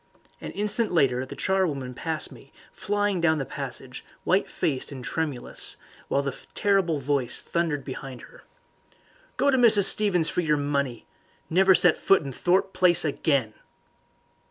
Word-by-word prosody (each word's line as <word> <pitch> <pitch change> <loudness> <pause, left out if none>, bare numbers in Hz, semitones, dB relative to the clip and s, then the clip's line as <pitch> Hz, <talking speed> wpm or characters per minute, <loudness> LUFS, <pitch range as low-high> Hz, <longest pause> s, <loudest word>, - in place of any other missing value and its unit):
An - - -6
instant 210 +2 -1
later 130 -6 +1
the 140 - -9
charwoman 150 -8 -1
passed 160 +4 -3
me, 135 - -15 0.2
flying 205 -2 -1
down 160 -2 +3
the 135 - -3
passage, - - -7 0.2
white - - +1
faced 135 0 -2
and 130 -2 -8
tremulous, 150 -6 -4 0.3
while 140 - 0
the 140 -1 -4 0.2
terrible 195 -6 +1
voice 140 -2 -1
thundered 165 -4 -2
behind 130 -2 -8
her. - - -16 0.9
"Go 280 - +3
to 265 - +2
Mrs. 220 -4 +6
Stevens 185 -5 +4
for 180 - 0
your 150 -3 +1
money! 140 -4 -2 0.5
Never 190 +2 +5
set 175 -2 +3
foot 195 -4 +3
in 140 - -6
Thorpe 185 +7 0
Place 175 -3 +4
again!" 140 -6 0
160 Hz, 150 wpm, -25 LUFS, 140-190 Hz, 0.9 s, Mrs